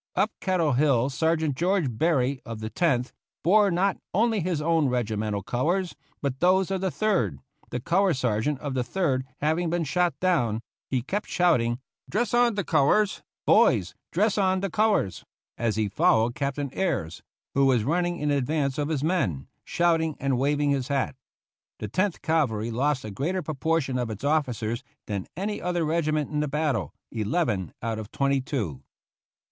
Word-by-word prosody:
Up - - +2
Kettle 180 -5 +1
Hill 135 -1 +3
Sergeant 160 0 +1
George 180 +3 +1
Berry, 135 -2 +1
of 115 -2 -7
the 110 0 -5
Tenth, 135 -8 +1 0.3
bore 205 +4 +5
not 190 +2 +1 0.2
only 225 +1 +3
his 175 -3 -1
own 160 -1 +2
regi 120 -3 -1
mental 105 -1 -2
colors 170 - -1 0.3
but 135 -2 -2
those 185 +1 +3
of 190 -1 -1
the 190 - +1
Third, 180 - 0 0.3
the 125 - -3
color 175 +5 +2
sergeant 125 +2 0
of 145 -3 -3
the 130 -1 0
Third 130 -2 -1
having 160 +3 +1
been 175 0 0
shot 160 0 0
down; 120 -12 +1 0.3
he 130 -3 0
kept 200 +10 -3
shouting, 125 -10 +2 0.3
"Dress 235 +5 0
on 240 -2 +4
the 200 - -1
colors, 195 +9 +2 0.2
boys, - - +4 0.2
dress 210 -1 +2
on 190 -1 +2
the 195 -2 -2
colors!" 210 - +1 0.3
as 115 -2 -1
he 110 -1 +1
followed 120 - +3
Captain 140 0 -2
Ayres, 140 - -2 0.3
who 140 0 +4
was 125 -5 +3
running 175 +6 0
in 150 -2 0
advance 140 0 0
of 145 +1 -1
his 150 -3 -1
men, 125 - 0 0.2
shouting 165 -3 +1
and 135 -3 0
waving 145 +1 +2
his 135 -2 0
hat. 140 -2 -1 0.6
The 105 - -5
Tenth 185 - -1
Cavalry 120 -9 +1
lost 130 +2 0
a 105 - -5
greater 170 - -2
proportion 155 -3 -1
of 120 -2 -2
its 110 +1 -7
officers 125 -6 0 0.2
than 100 -3 -4
any 205 +3 -3
other 175 -2 0
regiment 155 -2 0
in 150 - -1
the 150 - 0
battle 150 -3 -1
— - - -61
eleven 110 - -1
out 115 -1 -2
of 110 0 -8
twenty 140 -1 +1
two. 105 - -3
145 Hz, 175 wpm, -26 LUFS, 125-175 Hz, 0.6 s, bore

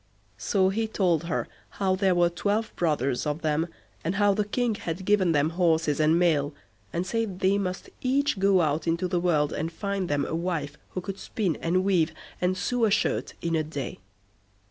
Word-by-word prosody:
So 190 - +2
he 220 +3 -1
told 175 -6 +1
her 170 - -1 0.3
how 190 -2 +2
there 190 -1 +2
were 175 0 +3
twelve 210 +5 -1
brothers 145 -5 0
of 150 +2 -2
them, 155 +2 +1 0.4
and 170 +5 -1
how 205 0 +4
the 210 +1 0
King 240 +1 0
had 180 -2 -5
given 195 -4 +3
them 150 0 +2
horses 165 -4 +2
and 155 +2 +4
mail, 150 -5 +2 0.4
and 175 +2 -2
said 215 -2 -2
they 195 +1 +3
must 185 -1 -3
each 275 -2 +1
go 195 -1 +4
out 155 0 0
into 170 +2 +1
the 175 -1 0
world 155 -4 +1
and 160 +2 -2
find 200 +1 -3
them 145 -1 +1
a - - -4
wife 165 -4 -2 0.2
who - - 0
could 195 +1 -6
spin, 190 -7 -1
and 185 +3 +1
weave, 175 -5 +2 0.3
and 180 +1 +1
sew 235 +4 +1
a - - +3
shirt 205 - 0
in 170 -1 0
a 160 - +2
day. 145 -8 -5
180 Hz, 195 wpm, -27 LUFS, 160-200 Hz, 0.4 s, how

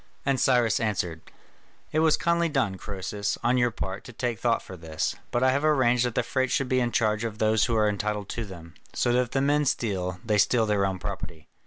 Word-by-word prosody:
And 135 -1 +1
Cyrus 120 -6 +3
answered: 90 -7 -2 0.7
"It 155 - +1
was 160 -1 +4
kindly 170 0 +1
done, 135 -9 0
Croesus, 100 +2 -4
on 125 +2 +3
your 120 0 +3
part, 95 -3 -5
to - - -9
take 120 -2 -3
thought 120 -1 +1
for 95 - -9
this: 80 -2 -3 0.2
but 120 - 0
I 130 - +5
have 140 +3 0
arranged 125 -5 +3
that 120 - -6
the - - +2
freights 130 -1 -1
should 135 - +1
be 130 - +2
in 120 -1 0
charge 110 -3 +1
of 110 -2 -4
those 110 0 +3
who 115 - 0
are 110 -1 +3
entitled 105 0 -2
to 115 - -3
them, 85 -5 -10 0.2
so 120 - +1
that 125 - +3
if 125 - -3
the 135 - 0
men 145 +2 +2
steal, 95 -8 -1
they 105 -2 +2
steal 115 +2 +3
their 100 -2 +1
own 95 -1 -3
property." 85 -5 -7
115 Hz, 230 wpm, -26 LUFS, 100-125 Hz, 0.7 s, I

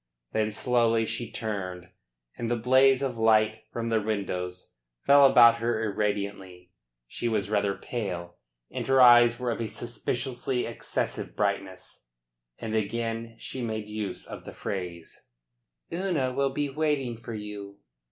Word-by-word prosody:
Then 110 -1 +1
slowly 115 0 +2
she 115 0 -4
turned 95 -6 -5 0.5
and 115 -1 -3
the 120 - +2
blaze 130 +3 +4
of 125 -4 -2
light 110 -1 +3
from 115 0 -3
the 110 -1 +2
windows 90 -4 -4 0.3
fell 140 0 +7
about 120 -3 +7
her 115 -1 -1
irradiantly. 100 -4 -3 0.4
She 120 - -3
was 105 -2 -1
rather 100 -2 +1
pale, 90 -7 -5 0.3
and - - -4
her 135 0 +4
eyes 120 -1 +7
were 125 -1 -2
of 115 - -3
a 115 - -1
suspiciously 120 +2 -3
excessive 115 - -4
brightness. 100 -2 -3 0.6
And 110 -1 -5
again 115 +1 -2
she 130 - -6
made 110 -2 -4
use 105 -3 -4
of - - -9
the - - -9
phrase: 90 -4 -6 0.7
"Una 170 -8 0
will 140 +1 +1
be 145 +2 -1
waiting 140 -4 -1
for 115 0 -6
you." 105 -1 -7
115 Hz, 140 wpm, -27 LUFS, 100-120 Hz, 0.7 s, fell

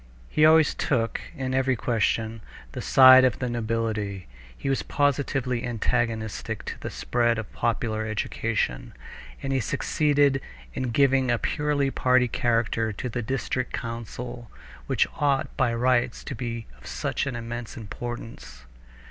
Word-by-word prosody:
He 155 0 +5
always 160 -1 +5
took, 115 -5 -1
in 130 -3 -3
every 130 0 +2
question, 115 -1 0 0.3
the - - -5
side 130 -1 +8
of 130 -2 +3
the 125 - -2
nobility; 110 -5 -2 0.3
he - - -5
was 135 -1 +1
positively 135 -3 0
antagonistic 115 -2 -2
to - - -6
the - - -5
spread 120 -1 0
of 110 -2 -6
popular 110 -1 -1
education, - - -2 0.5
and 135 0 -1
he 135 - +2
succeeded 140 +1 +2 0.3
in 130 -1 -2
giving 135 +1 +3
a 120 - +3
purely 145 0 0
party 125 -1 +3
character 115 -1 0
to 115 +5 -5
the 120 +1 -3
district 125 +1 -2
council 120 +1 -6 0.4
which - - +3
ought 140 -2 +1
by 125 -2 +2
rights 120 +1 +1
to - - -5
be 115 -2 -4
of - - -13
such - - -2
an 135 - -3
immense 120 0 -6
importance. 115 - -7
120 Hz, 140 wpm, -26 LUFS, 115-130 Hz, 0.5 s, side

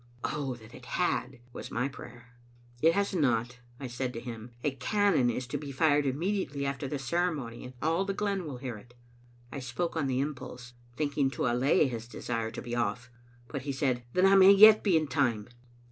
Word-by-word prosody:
"Oh, 140 -4 -2
that 110 -1 -15
it 125 - -12
had!" 130 -8 -1
was - - -7
my 125 +3 -1
prayer. 125 -2 -12 0.5
"It 165 +1 +5
has 200 +1 0
not," 125 -6 0 0.2
I 140 - -6
said 125 +1 -3
to 115 - -5
him. 115 -1 -8
"A 145 - +1
cannon 155 - +2
is 125 +2 -2
to 145 - -2
be 145 -1 -7
fired 145 +1 +2
immediately 145 -1 -1
after 140 +1 -3
the 145 - -3
ceremony, 140 -4 -2
and 125 - -9
all 165 +4 +2
the 195 0 -3
glen 200 -3 -1
will 135 -4 -6
hear 125 -3 -6
it." 120 +3 -19 0.6
I 140 - -5
spoke 135 +8 -3
on 150 -4 0
the 130 -1 0
impulse, 125 -3 -5 0.2
thinking 145 -2 0
to 135 - -3
allay 125 +4 +3
his 115 -2 -5
desire 115 -2 -3
to 115 - -7
be 120 -1 -4
off; 120 +1 -2 0.4
but 140 0 -5
he 140 +2 -3
said, 130 -3 0
"Then 185 - +4
I 195 - +6
may 190 0 +8
yet 215 +2 +9
be 190 -6 +4
in 155 - +1
time." 125 -7 0
135 Hz, 205 wpm, -29 LUFS, 125-155 Hz, 0.6 s, yet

